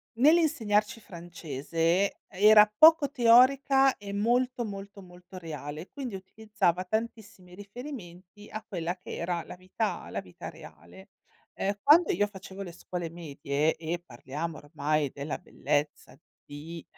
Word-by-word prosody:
Nell'insegnarci 250 -7 +3
francese, 170 0 -2
era 210 +2 +6
poco 315 +1 +7
teorica 270 +2 +5
e 200 -1 -8
molto, 240 +4 +1
molto, 200 -1 -8
molto 180 +1 -14
reale, 155 -1 -7
quindi 260 -7 -6
utilizzava 190 -2 -1
tantissimi 220 -3 -5
riferimenti 205 - -10
a 215 0 -7
quella 175 -1 -3
che - - -8
era 170 -1 -2
la - - -10
vita 185 +4 -4
la - - -3
vita 90 - -10
reale. 85 +5 -14 0.4
Ehm, 200 +1 -2
quando 315 +3 +6
io 205 +4 +2
facevo 195 -1 -9
le 180 - -8
scuole 175 0 -6
medie 150 -2 -2
e 165 +1 -4
parliamo 155 +4 -6
ormai 145 -1 -1
della 140 +2 -4
bellezza 145 -6 -3 0.3
di 155 +3 -9
185 Hz, 125 wpm, -28 LUFS, 165-220 Hz, 0.4 s, poco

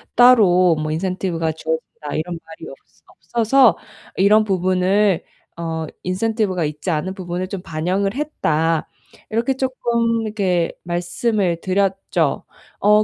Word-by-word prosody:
따로 190 -8 +6
뭐 155 0 -3
인센티브가 175 -1 -1
주어진다. 160 -2 -5
이런 170 +2 -3
말이 160 0 -10
없어 - - -17 0.4
없어서 230 -3 +5 0.4
이런 210 +3 +5
부분을 185 0 +2 0.3
어 160 -1 -3 0.2
인센티브가 190 -2 0
있지 150 +4 -3
않은 160 +5 -2
부분을 180 0 -4
좀 195 -3 -5
반영을 185 +6 -1
했다." 165 - 0 0.4
이렇게 235 +4 +1
쪼끔 235 -3 0
이렇게 190 -6 0
말씀을 175 +1 -1
드렸죠. 190 -5 0 0.4
어 210 +1 +5
185 Hz, 275 characters per minute, -20 LUFS, 165-215 Hz, 0.4 s, 따로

